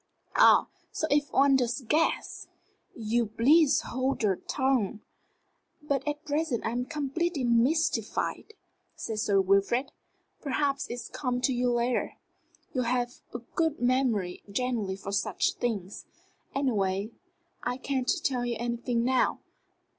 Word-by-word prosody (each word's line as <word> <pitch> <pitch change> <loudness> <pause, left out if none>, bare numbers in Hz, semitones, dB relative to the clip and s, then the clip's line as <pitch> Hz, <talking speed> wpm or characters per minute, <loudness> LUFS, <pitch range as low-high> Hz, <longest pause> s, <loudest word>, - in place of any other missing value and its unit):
"Ah! - - +6 0.2
So - - -1
if 290 -1 +2
one 275 0 +5
does 245 +1 -1
guess 300 +7 0 0.2
" - - -43
"You'll 230 +1 0
please 285 +7 +4
hold 260 0 -2
your 195 -4 +2
tongue." 260 -7 0 0.8
"But 285 -1 -1
at 295 0 -3
present 295 -4 -1
I'm 240 +2 -1
completely 300 +2 -2
mystified," 265 - +1 0.4
said 220 -2 -4
Sir 205 -3 +2
Wilfrid. 200 +7 +2 0.5
"Perhaps 280 -1 -1
it'll 240 -1 -6
come 250 -3 -1
to 255 +1 +2
you 245 0 +1
later. 240 +1 0 0.6
You've 255 -3 0 0.5
a 240 - -5
good 325 -2 0
memory 245 -8 +1
generally 220 -4 -1
for 195 0 -7
such 200 -1 0
things. 210 -5 -4 0.5
Anyway, 205 -6 0 0.5
I 245 0 -2
can't 265 -1 -1
tell 255 -3 0
you 240 -1 -1
anything 235 0 -1
now. 255 +1 +1
245 Hz, 125 wpm, -28 LUFS, 230-275 Hz, 0.8 s, Ah